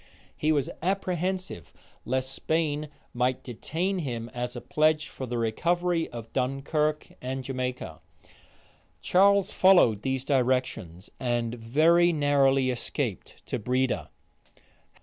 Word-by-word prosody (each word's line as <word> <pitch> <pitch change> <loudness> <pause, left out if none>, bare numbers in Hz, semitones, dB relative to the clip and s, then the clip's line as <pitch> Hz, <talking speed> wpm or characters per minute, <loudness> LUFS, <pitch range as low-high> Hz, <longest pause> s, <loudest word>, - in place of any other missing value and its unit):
He 155 - +1
was 145 -4 +1
apprehensive 185 - -2 0.3
lest 130 +2 -1
Spain 155 -1 -1 0.2
might 125 +1 0
detain 170 - -2
him 120 -7 -4
as 125 0 -4
a - - -4
pledge 155 +2 +2
for 130 - -7
the 120 0 -3
recovery 170 +9 0
of 115 -1 -9
Dunkirk 145 +4 -1
and 130 +1 -4
Jamaica. 125 -1 -4 1.0
Charles 200 +1 +4
followed 175 - +5
these 130 +1 -2
directions, 125 - -1
and 120 -2 -1
very 155 +9 +3
narrowly 135 -3 +3
escaped 120 - -4
to - - -3
Breda. 125 +4 0
135 Hz, 110 wpm, -27 LUFS, 125-160 Hz, 1.0 s, followed